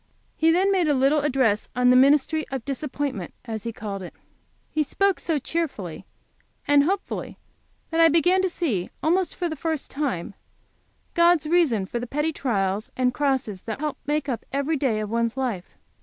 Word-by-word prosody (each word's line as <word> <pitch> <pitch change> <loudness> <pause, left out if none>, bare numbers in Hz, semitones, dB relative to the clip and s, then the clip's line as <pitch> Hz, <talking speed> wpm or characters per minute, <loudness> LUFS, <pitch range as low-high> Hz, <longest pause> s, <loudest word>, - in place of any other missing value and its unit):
He 320 - +3
then 370 +4 +3
made 365 -4 +2
a 295 - +3
little 275 +3 +3
address 260 -7 +1
on 250 0 +4
the - - +5
ministry 290 +4 +4
of 265 -4 -5
disappointments, 275 - -4
as 220 -2 -5
he 230 - -2
called 205 -3 -6
it. 180 - -9 0.6
He 310 - +1
spoke 390 +6 +1
so 325 -3 0
cheerfully 270 - -4 0.6
and 285 0 +5
hopefully 385 +3 -3 0.5
that 325 - 0
I 330 - +7
began 355 +4 +3
to 375 - +1
see 245 - -2
almost 355 +3 +1
for 355 - -1
the 315 - -4
first 315 0 -3
time 265 - -2 0.8
God's 340 -2 +4
reason 305 - +2
for 240 +5 -4
the 245 - -5
petty 300 +5 -1
trials 205 -6 -1
and 250 -1 +2
crosses 265 -9 -1
that 220 - -4
help 300 -1 -3
to - - -35
make 300 -1 0
up 245 -4 -3
every 280 +3 0
day 255 -7 0
of 210 0 -5
one's 230 +1 0
life. 235 -9 -3
280 Hz, 185 wpm, -24 LUFS, 230-320 Hz, 0.8 s, I